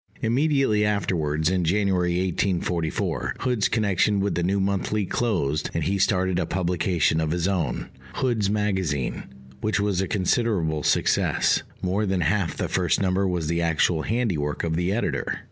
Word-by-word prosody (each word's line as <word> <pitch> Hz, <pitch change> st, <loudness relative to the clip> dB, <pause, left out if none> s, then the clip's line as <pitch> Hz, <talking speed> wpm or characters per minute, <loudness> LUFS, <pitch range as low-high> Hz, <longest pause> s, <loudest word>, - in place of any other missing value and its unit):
Immediately 135 Hz, -2 st, +2 dB
afterwards, 85 Hz, -6 st, 0 dB
in 95 Hz, -1 st, +1 dB
January 90 Hz, -1 st, +1 dB
1844, 85 Hz, -6 st, -1 dB
Hood's 125 Hz, -5 st, +1 dB
connection 105 Hz, -2 st, +1 dB
with 100 Hz, -1 st, 0 dB
the 85 Hz, -, -1 dB
New 95 Hz, +3 st, +1 dB
Monthly 100 Hz, +1 st, 0 dB
closed, 85 Hz, -, -1 dB
and -, -, 0 dB
he 100 Hz, +1 st, 0 dB
started 95 Hz, -2 st, +1 dB
a 85 Hz, -, -1 dB
publication 85 Hz, -3 st, +1 dB
of 80 Hz, -, -1 dB
his 85 Hz, +2 st, 0 dB
own, 85 Hz, -10 st, -2 dB, 0.2 s
Hood's 115 Hz, -6 st, 0 dB
Magazine, 95 Hz, -, -1 dB, 0.4 s
which 110 Hz, -1 st, 0 dB
was 100 Hz, -3 st, 0 dB
a 95 Hz, -, -1 dB
considerable 90 Hz, -5 st, 0 dB
success: -, -, +2 dB, 0.2 s
more 100 Hz, +3 st, 0 dB
than 95 Hz, -1 st, 0 dB
half 90 Hz, +2 st, 0 dB
the -, -, -1 dB
first -, -, +1 dB
number 95 Hz, 0 st, +1 dB
was 90 Hz, -3 st, -1 dB
the 85 Hz, +2 st, 0 dB
actual 80 Hz, 0 st, +1 dB
handiwork 90 Hz, -10 st, -1 dB
of 80 Hz, -1 st, -1 dB
the 90 Hz, +2 st, 0 dB
editor. 115 Hz, +4 st, -2 dB
95 Hz, 155 wpm, -24 LUFS, 85-105 Hz, 0.4 s, Immediately